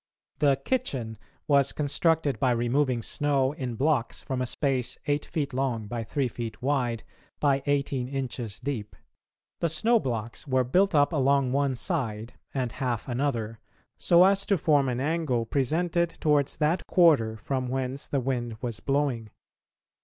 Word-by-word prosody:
The 140 -2 +3
"kitchen" 130 - -2 0.3
was 140 -3 +3
constructed 150 0 +1
by 130 -3 +3
removing 120 +1 +1
snow 140 -1 +1
in 130 -5 -5
blocks 135 -2 0
from 130 -1 -3
a 125 - -1
space 130 -1 -1
eight 145 0 0
feet 145 -4 -3
long 125 -4 -1
by 115 +2 -4
three 135 +4 -1
feet 115 -2 -6
wide 125 -4 0 0.4
by 140 -2 +2
eighteen 140 -3 0
inches 130 -5 -4
deep. 125 -6 -4 0.6
The 170 - +1
snow 225 +10 +3
blocks 115 - -4
were 130 -1 +2
built 180 +9 +2
up 145 +1 +4
along 140 -2 +2
one 140 -1 +1
side 120 - -2 0.2
and 130 -3 -2
half 120 -4 -3
another, 120 -4 -2 0.4
so 175 0 +5
as 195 +1 +4
to 200 - +3
form 145 -4 +3
an 125 0 -2
angle 145 -5 0
presented 165 +7 0
towards 145 -3 +2
that 155 +4 0
quarter 145 -12 +4
from 130 +4 -2
whence 130 +1 -3
the 140 - 0
wind 120 -3 -2
was 120 -3 -4
blowing. 135 -6 -1
135 Hz, 155 wpm, -27 LUFS, 120-145 Hz, 0.6 s, so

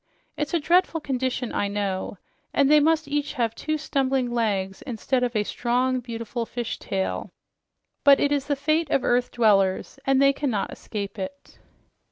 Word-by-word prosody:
It's 300 +2 -2
a - - +3
dreadful 340 +2 +2
condition, 260 -3 -2
I 205 - 0
know, 200 -1 -3 0.4
and 280 0 +4
they 300 - +8
must 315 0 +2
each 290 0 -1
have 230 -2 0
two 310 +5 -2
stumbling 270 -4 0
legs 200 -5 -1
instead 250 +1 -1
of 245 -1 -1
a 210 - +2
strong, 250 +4 0
beautiful 230 -1 -5
fish 240 -2 -4
tail, 190 -1 -3 0.7
but 280 -1 +7
it 285 - +2
is 285 -1 0
the 290 - +1
fate 310 +2 0
of 275 - +1
earth 245 0 +2
dwellers, 205 0 +2
and 270 0 +3
they 275 0 +5
cannot 260 -8 -2
escape 205 -1 -6
it." 280 +10 -8
255 Hz, 170 wpm, -25 LUFS, 225-285 Hz, 0.7 s, they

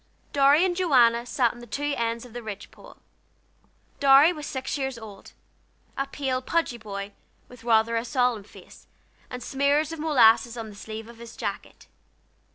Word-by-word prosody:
Dorry 285 +4 +5
and 360 -2 0
Joanna 245 -9 +3
sat 245 -2 +1
on 240 - -14
the 240 - -12
two 290 +5 -2
ends 230 0 -2
of 240 - -14
the 240 - -6
ridge 205 -3 -8
pole. - - -16 1.0
Dorry 280 +4 +6
was 300 -3 -7
six 265 -1 -4
years 265 -3 -3
old; 210 -3 -12 0.6
a 275 - -2
pale, 265 -2 -2
pudgy 260 -4 -1
boy, 200 -2 -7 0.3
with 245 -2 -15
rather 230 0 +3
a 230 - 0
solemn 245 -3 0
face, - - -16 0.4
and 250 0 -7
smears 285 +3 +1
of 325 - -7
molasses 240 -6 +4
on 225 -1 -6
the - - -13
sleeve 220 +2 -8
of 235 -1 -14
his 235 0 -11
jacket. - - -6
245 Hz, 170 wpm, -25 LUFS, 230-280 Hz, 1.0 s, Dorry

